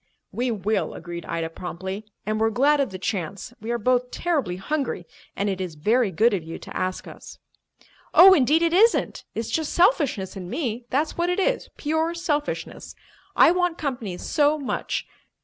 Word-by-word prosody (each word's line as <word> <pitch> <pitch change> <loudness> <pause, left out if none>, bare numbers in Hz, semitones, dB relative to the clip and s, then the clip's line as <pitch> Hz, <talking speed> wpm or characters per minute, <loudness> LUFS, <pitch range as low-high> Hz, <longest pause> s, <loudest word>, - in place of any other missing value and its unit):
"We 250 +1 -1
will," 215 -1 -1
agreed 170 0 -7
Ida 165 -1 -3
promptly. 190 +4 -6 0.2
"And 215 0 -1
we're 225 - +4
glad 280 +6 +3
of 275 - +1
the 190 - -7
chance. 195 +3 -4
We 220 - -6
are 240 - +1
both 250 +2 +1
terribly 280 - -1
hungry, 250 - -3 0.3
and 200 - -1
it 190 -2 -2
is 180 -4 -5
very 220 +8 +2
good 220 +6 +3
of 185 -5 -1
you 165 +1 -7
to - - -11
ask 185 0 -2
us." - - -11 0.7
"Oh, 380 +2 +9
indeed, 310 +1 +4
it 335 0 +2
isn't! 445 +6 +3
It's 225 - -3
just 315 -2 -1
selfishness 295 - +2
in 180 -2 -7
me, 240 - -3
that's 300 +5 -1
what 345 +1 +1
it 360 - 0
is, - - 0
pure 320 +2 0
selfishness! 300 -4 -3 0.4
I - - +7
want 355 -1 0
company 245 - -4
so 295 +7 +2
much. 280 -3 -3
240 Hz, 180 wpm, -24 LUFS, 190-310 Hz, 0.7 s, Oh